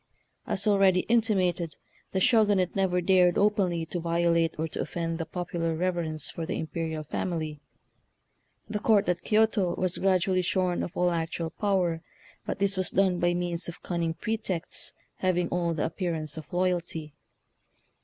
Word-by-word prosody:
As 200 +2 0
already 195 -3 +4
intimated, 190 -8 +1 0.4
the 190 - 0
Shogunate 205 -4 +3
never 185 -2 +2
dared 180 -1 +4
openly 190 -5 +2
to 175 +2 -4
violate 170 -1 +1
or 160 +1 -1
to - - -4
offend 165 -1 -3
the 165 - -3
popular 170 -2 -2
reverence 165 -3 -1
for 165 - -5
the - - -3
imperial 160 -1 -3
family. 155 -1 -3 1.1
The 210 0 -2
Court 210 -2 +3
at 180 0 0
Kioto 215 -4 +2
was 185 -1 -1
gradu 190 -1 +2
ally 185 -1 +3
shorn 180 0 0
of 170 - -5
all 180 0 +3
actual 165 0 -2
power, 180 -5 0 0.5
but - - -2
this 200 -1 0
was 185 - +1
done 185 -2 +2
by 175 0 +2
means 175 -1 -2
of 170 - -10
cunning 170 -2 -1
pretexts 215 -6 -4 0.3
having 180 -2 +1
all 170 -1 0
the 150 - 0
appearance 165 -3 -3
of 155 -2 -9
loyalty. 175 -4 -1
175 Hz, 155 wpm, -28 LUFS, 165-190 Hz, 1.1 s, already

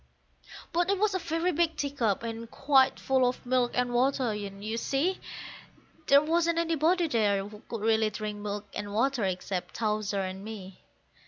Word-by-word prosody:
But 350 +2 +2
it 400 - +2
was 415 +1 +2
a 375 - 0
very 335 +1 0
big 330 0 +1
teacup, 250 -8 0
and 230 0 -5
quite 270 -1 +3
full 265 -1 +2
of 250 - -7
milk 245 -1 +1
and 250 -1 0
water, 255 -1 +2
and, 200 -1 -6
you 220 +1 -2
see, 280 +10 0 0.9
There 280 +1 +7
wasn't 335 +1 +1
anybody 335 +1 +2
there 205 -7 +1
who 210 0 -12
could 230 -3 -4
really 220 0 +3
drink 210 0 -5
milk 205 0 -4
and 205 0 -5
water 255 0 +1
except 185 0 -3
Towser 210 -2 -1
and 190 +1 -5
me. 200 -4 -9
240 Hz, 170 wpm, -29 LUFS, 210-300 Hz, 0.9 s, There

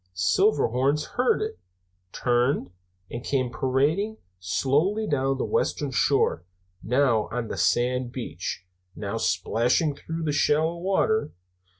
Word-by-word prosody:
Silverhorns 140 - +2
heard 250 +1 +2
it, - - -5 0.5
turned, 120 -5 0 0.4
and 120 - -5
came 130 -4 0
parading 150 +13 0 0.2
slowly 150 - +1
down 135 -5 0
the - - -1
western 145 -2 -1
shore, 130 - +2 0.4
now 125 -3 +2
on 120 -1 -3
the - - -3
sand 125 0 +1
beach, 90 -7 -5 0.3
now 105 +1 -4
splashing 120 - +1
through 165 +3 -5
the 155 - 0
shallow 155 +3 +2
water. 195 0 +1
135 Hz, 115 wpm, -25 LUFS, 120-155 Hz, 0.5 s, Silverhorns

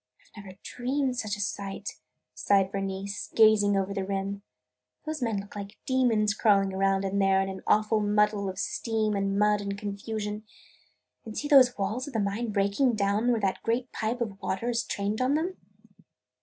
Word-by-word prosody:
"I - - -9
never 190 -2 -12
dreamed 265 +3 -1
of - - -5
such 215 -4 -2
a - - -11
sight!" 200 -1 -4 0.3
sighed 195 -1 +2
Bernice, 195 0 -4
gazing 215 -2 +5
over 195 0 -1
the 195 -1 -2
rim. 195 +1 -3 0.6
"Those 310 -2 -4
men 225 -4 0
look 200 +1 -10
like 200 +1 -7
demons 230 -5 +2
crawling 195 -2 +3
around 195 0 +2
there 195 0 +2
in 195 0 -3
that - - -13
awful 215 +1 +3
muddle 210 -1 +1
of 185 - -7
steam 215 +2 -1
and 195 0 0
mud 210 0 +3
and 200 0 -4
confusion! 210 +1 -4 0.8
And 220 -2 -8
see 295 - -2
those 265 -4 +6
walls 215 +7 -2
of 285 - -8
the - - +2
mine 210 +3 -1
breaking 205 +5 +2
down 210 +4 +1
where 230 -2 0
that 195 -1 -1
great 240 +2 -1
pipe 230 +3 -3
of 205 -4 -4
water 230 +6 -2
is 235 0 0
trained 205 +3 -2
on 260 +3 +2
them!" 345 +5 -2
205 Hz, 185 wpm, -28 LUFS, 195-230 Hz, 0.8 s, those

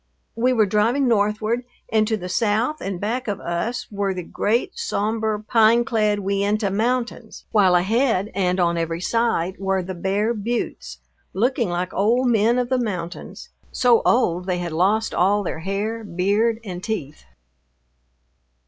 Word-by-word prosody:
We 245 +3 +2
were 225 -4 +3
driving 225 +7 +2
northward, 215 +2 +1 0.3
and 215 -1 +2
to 220 -1 0
the 180 -3 -6
south 225 +9 0
and 195 -2 -4
back 235 +5 -2
of 200 -2 -2
us 170 +8 -3
were 200 -2 -1
the 180 - -4
great 235 - -1
somber, 220 - -1
pine 230 +1 +4
clad 215 -3 +1
Uintah 200 +1 0
Mountains, 235 +1 -2
while 190 -4 +4
ahead 210 +2 +1
and 185 -1 0
on 170 -1 +2
every 165 0 -2
side 190 -3 0
were 195 -1 0
the 185 +1 -5
bare 195 +5 0
buttes, 230 +2 -4 0.4
looking 235 +1 +1
like 175 +1 -3
old 235 +6 +2
men 230 +1 +3
of 250 -1 0
the 260 -1 +1
mountains, 180 -7 -5 0.2
so 245 -2 +4
old 180 -7 +2
they 180 -1 0
had 175 -1 -4
lost 205 +7 +1
all 200 +3 +2
their 165 - -4
hair, 205 +6 -3
beard, 205 +5 0
and 185 -3 -7
teeth. 180 -10 -4
210 Hz, 155 wpm, -22 LUFS, 185-230 Hz, 0.4 s, pine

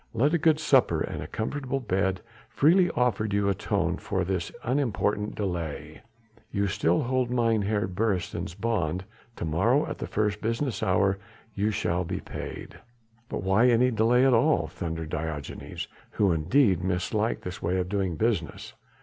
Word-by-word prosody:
Let 145 +7 +3
a 170 - +3
good 155 0 +3
supper 130 - +3
and - - -3
a - - -6
comfortable 135 +4 -3
bed 95 -5 0 0.3
freely 175 +8 +4
offered 115 -4 +1
you 100 0 +2
atone 95 - 0
for 95 - -2
this 90 -2 -2
unimportant 110 -5 0
delay. 90 -7 -4 0.5
You 100 -2 0
still 105 +9 +1
hold 130 0 0
Mynheer 110 -4 +1
Beresteyn's 95 -3 -2
bond: 95 -6 -1 0.3
to - - -4
morrow 110 - +2
at - - -6
the - - -4
first 105 0 -1
business 115 0 -1
hour 95 -1 +2 0.3
you 105 +2 0
shall 90 -4 0
be 85 - -3
paid." - - -8 0.5
"But - - -4
why 95 +6 +4
any 125 +2 +4
delay 120 +3 +3
at 135 - +5
all?" 145 +7 +3
thundered 80 -3 -5
Diogenes, 75 -2 -5 0.3
who 100 -3 +3
indeed 95 - +3
misliked 95 +5 -1
this 90 +1 -6
way 90 +2 0
of 90 -1 -1
doing 95 -3 -1
business. 100 -7 -2
105 Hz, 155 wpm, -27 LUFS, 90-120 Hz, 0.5 s, at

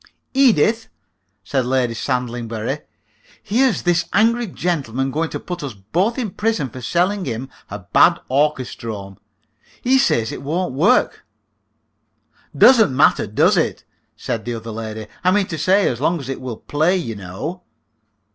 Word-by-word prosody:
"Edith," 230 - +3 0.6
said 135 -2 0
Lady 125 -1 0
Sandlingbury, 120 +1 -3 0.6
"here's 235 +3 +1
this 175 -1 +1
angry 230 +4 +3
gentleman 135 - -2
going 160 +3 -1
to - - -5
put 175 -1 -6
us 135 -6 -6
both 175 - -1
in 230 -7 -2
prison 210 - -1
for 130 - -9
selling 180 - 0
him 125 +1 -4 0.2
a 100 - -5
bad 95 -4 +3
orchestrome. 115 -8 -2 0.6
He 265 +2 +4
says 115 - +1
it - - -7
won't 160 +2 -2
work." 185 - +2 1.3
"Doesn't 220 - +6
matter, - - +4
does - - +3
it?" - - 0 0.3
said 115 - -3
the 120 +1 -4
other 115 0 -7
lady. 110 0 -6 0.2
"I 180 - +4
mean 200 +1 +3
to 165 - -4
say, 190 +6 +3
as 120 0 -2
long 165 +3 +1
as 135 -2 -8
it 135 - -4
will 125 -4 -5
play, 160 +6 +1
you 115 -11 -4
know." 105 - -6
145 Hz, 150 wpm, -20 LUFS, 115-185 Hz, 1.3 s, Doesn't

